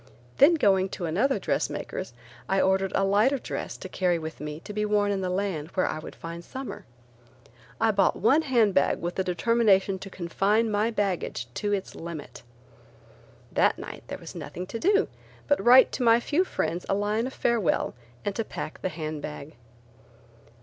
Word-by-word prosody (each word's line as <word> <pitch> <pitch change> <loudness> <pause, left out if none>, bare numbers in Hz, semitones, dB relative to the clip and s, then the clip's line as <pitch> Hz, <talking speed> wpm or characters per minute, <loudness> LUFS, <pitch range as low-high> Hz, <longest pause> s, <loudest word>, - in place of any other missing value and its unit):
Then 315 +5 +7
going 195 -9 +3
to 180 - -3
another 215 - +1
dressmaker's, 185 -10 -3 0.4
I 195 - +2
ordered 190 0 +2
a 195 - +2
lighter 210 +8 +3
dress - - -5
to - - -8
carry 180 -2 +1
with 160 0 -7
me 150 0 -5
to 210 - -8
be 210 +1 -1
worn 210 -1 +2
in 195 -1 -1
the 185 - -1
land 180 -5 -2
where 185 - +2
I - - -2
would - - -9
find 170 +1 -7
summer. 265 +7 -7 0.9
I 225 0 +3
bought 200 -1 +3
one 275 +9 +4
hand 235 -9 +3
bag 140 - +3
with 175 +1 -3
the 190 - -1
determination 195 0 +2
to 195 - -8
confine 195 +5 +1
my 210 +2 +1
baggage 200 - -2
to 205 +7 -2
its 195 -2 -2
limit. 165 -3 -8 1.1
That - - +3
night - - -8
there - - -5
was - - -10
nothing 180 - -6
to 230 - -2
do 405 - +3 0.4
but 285 - +2
write 255 +2 +7
to 255 - -2
my 230 0 +6
few 310 +9 +1
friends 175 - -2
a 195 - +2
line 210 +4 0
of 265 - -7
farewell 235 -7 +1 0.3
and 205 - 0
to 225 - -1
pack 160 - -7
the 185 - -1
hand 155 -2 -5
bag. 150 0 -7
195 Hz, 185 wpm, -27 LUFS, 175-230 Hz, 1.1 s, Then